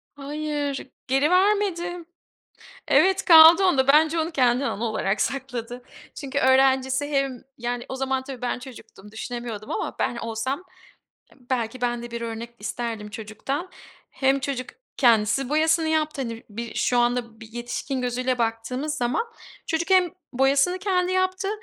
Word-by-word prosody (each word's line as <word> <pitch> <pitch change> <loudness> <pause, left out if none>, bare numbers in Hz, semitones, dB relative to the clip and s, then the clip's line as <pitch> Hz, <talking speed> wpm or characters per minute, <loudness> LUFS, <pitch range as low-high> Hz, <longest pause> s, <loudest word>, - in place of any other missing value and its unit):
Hayır, 290 -1 -4 0.2
geri 270 +4 +2
vermedim. 365 -3 +1 0.8
Evet, 380 0 +4
kaldı 330 +3 +9
onda. 270 -8 +3
Bence 315 +3 +5
onu 320 - -2
kendine 255 -3 +2
anı 230 -1 -3
olarak 215 -2 -1
sakladı. 250 -2 -3 0.3
Çünkü 280 -1 -4
öğrencisi 265 +1 +3
hem 275 -4 -1 0.2
Yani, 240 0 -3
o 265 - -5
zaman, 265 0 -1
tabii, 260 -2 -9
ben 245 - -1
çocuktum, 225 -5 -13
düşünemiyordum 230 -2 -6
ama - - -3
ben 240 - -1
olsam, 235 +8 -3 0.7
eee, - - -21
belki 245 -1 -2
ben 240 -1 -1
de 240 - -8
bir 235 0 -5
örnek 230 0 -5
isterdim 215 0 -4
çocuktan. 230 - -5 0.4
Hem 270 0 +1
çocuk 265 -2 -3 0.3
kendisi 235 +1 +3
boyasını 315 +2 +2
yaptı. 310 -3 0
Hani, 230 -2 -6
bir 230 +2 -6
şu 245 - +1
anda, 240 -2 0
bir 225 0 -12
yetişkin 245 +3 -4
gözüyle 250 0 -1
baktığımız 240 +6 -2
zaman, 245 - 0 0.4
çocuk 335 +3 -2
hem 370 -2 +5 0.2
boyasını 275 +7 +2
kendi 370 -2 0
yaptı 375 +1 0
265 Hz, 145 wpm, -24 LUFS, 240-310 Hz, 0.8 s, kaldı